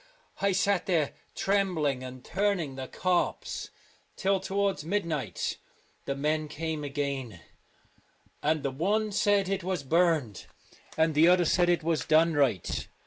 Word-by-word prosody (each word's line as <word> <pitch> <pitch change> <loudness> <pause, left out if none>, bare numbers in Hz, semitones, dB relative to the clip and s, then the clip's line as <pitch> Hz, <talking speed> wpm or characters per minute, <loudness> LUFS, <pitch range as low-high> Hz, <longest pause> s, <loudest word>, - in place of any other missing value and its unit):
I 200 - +3
sat 195 -1 +1
there 165 -6 +1 0.2
trembling 180 -9 +1
and 130 0 -9
turning 195 -8 0
the 130 0 -6
corpse 180 -1 -1 0.5
till 195 0 +1
towards 195 -2 -1
mid 200 +4 -1
night. 140 - -3 0.5
The 140 - -2
men 155 +2 0
came 155 0 -4
again, 140 - -3 1.0
and 155 0 +1
the 140 - -1
one 205 +10 0
said 205 -1 +2
it 195 -1 -2
was 180 -4 -2
burnt, 155 - +1 0.5
and 160 0 +3
the 155 +3 +5
other 180 0 +5
said 175 +2 +3
it 175 -2 +2
was 165 -1 0
done 160 +2 +4
right. 135 - 0
165 Hz, 140 wpm, -28 LUFS, 145-190 Hz, 1.0 s, the